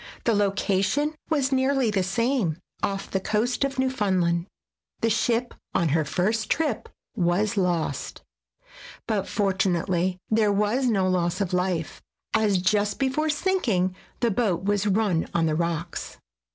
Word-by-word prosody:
The 230 - +2
location 200 +7 +1 0.2
was 285 -4 +1
nearly 265 -3 +2
the 200 -2 +1
same, 195 - 0 0.2
off 195 0 -2
the 190 - +1
coast 225 +7 0
of 275 -1 -1
Newfoundland. 190 -9 +1 0.5
The 230 - +2
ship, 235 +2 +1 0.2
on 170 - +2
her 160 +2 +2
first 215 +8 0
trip, 300 -8 0 0.3
was 190 +5 +1
lost, 175 -7 -1 0.8
but 205 -3 -1
fortunately 185 -2 0
there 215 -1 +3
was 210 +6 +1
no 195 -5 +2
loss 180 -1 0
of 195 -2 -1
life 180 -3 -1 0.3
as 215 -3 +3
just 205 +2 +1
before 275 +4 0
sinking 250 - +1 0.3
the 235 -2 +2
boat 190 -5 0
was 205 +1 +1
run 195 -5 +1
on 165 -1 +3
the 155 - +1
rocks. 170 +1 -3
200 Hz, 140 wpm, -25 LUFS, 180-235 Hz, 0.8 s, there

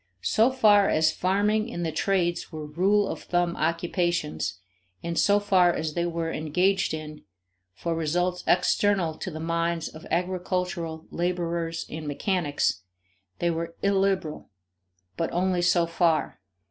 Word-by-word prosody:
So 225 +3 +4
far 210 -6 +5
as 155 0 +3
farming 210 +4 +1
and 175 -4 -3
the 160 - -1
trades 175 -1 0
were 155 -2 -6
rule 195 +7 +2
of - - -5
thumb 175 -1 0
occupations 165 - -1 0.4
and 170 0 -3
so 205 +4 +4
far 185 -3 +4
as 155 -2 -3
they 170 +1 0
were 165 -1 -2
engaged 180 +6 +1
in 155 -1 -8 0.5
for 170 - -2
results 175 +3 -1
external 180 -1 +2
to - - -4
the 155 -2 -7
minds 165 0 -1
of 155 - -12
agricultural 180 -2 -2
laborers 170 -1 -2
and 155 0 -7
mechanics, 145 - 0 0.6
they 170 0 +1
were 165 0 -4
illiberal 195 -5 0 0.7
but 165 - -1
only 180 0 +1
so 175 -1 +3
far. 165 - 0
175 Hz, 135 wpm, -26 LUFS, 165-185 Hz, 0.7 s, far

